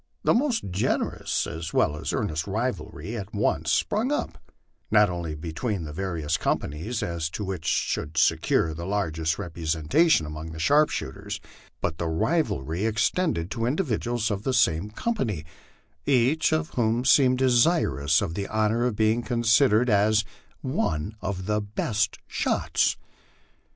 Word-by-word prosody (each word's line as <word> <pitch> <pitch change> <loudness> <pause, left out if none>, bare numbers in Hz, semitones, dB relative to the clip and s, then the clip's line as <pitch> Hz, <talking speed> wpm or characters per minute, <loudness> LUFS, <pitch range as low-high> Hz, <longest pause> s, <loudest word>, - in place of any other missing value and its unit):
The - - +4
most 240 - 0
generous 95 +4 -1
as 80 -1 -6
well 75 - +3
as 75 - -3
earnest 80 +1 -2
rivalry 110 0 -3
at 105 -1 -6
once 105 - +1
sprung 230 +6 +1
up, 295 - -2 0.5
not 105 -3 +5
only 85 -3 -4
be 80 +1 -6
tween 100 -1 -2
the 75 -1 -7
various 85 -2 -2
companies, 95 +13 -2
as 85 -2 -2
to 105 - -5
which 95 -4 -5
should 75 +2 -1
secure 80 0 +2
the 85 +3 -6
largest 80 -5 -1
representa 85 - +1
tion 80 - +4
among 75 +1 -7
the 80 - -8
sharpshooters, 150 - +1 0.4
but 80 - -2
the 85 - -1
rivalry 80 - 0
extended 110 - 0
to 115 0 -1
individuals 120 - -1
of 100 -1 -2
the 130 +3 -1
same 80 +2 +2
company, 110 - -2 0.6
each 140 +4 +3
of 160 +1 0
whom 120 +1 0
seemed 130 -1 +5
desirous 120 - +3
of 85 -5 -3
the 100 +2 -3
honor 110 +3 +1
of 120 - -2
being 110 +2 +2
considered 120 0 +3
as 105 0 +3 0.2
'* - - -34
one 105 - -2
of 95 -1 -3
the 105 +1 0
best 105 +1 -1
shots." - - 0
105 Hz, 150 wpm, -26 LUFS, 80-120 Hz, 0.6 s, not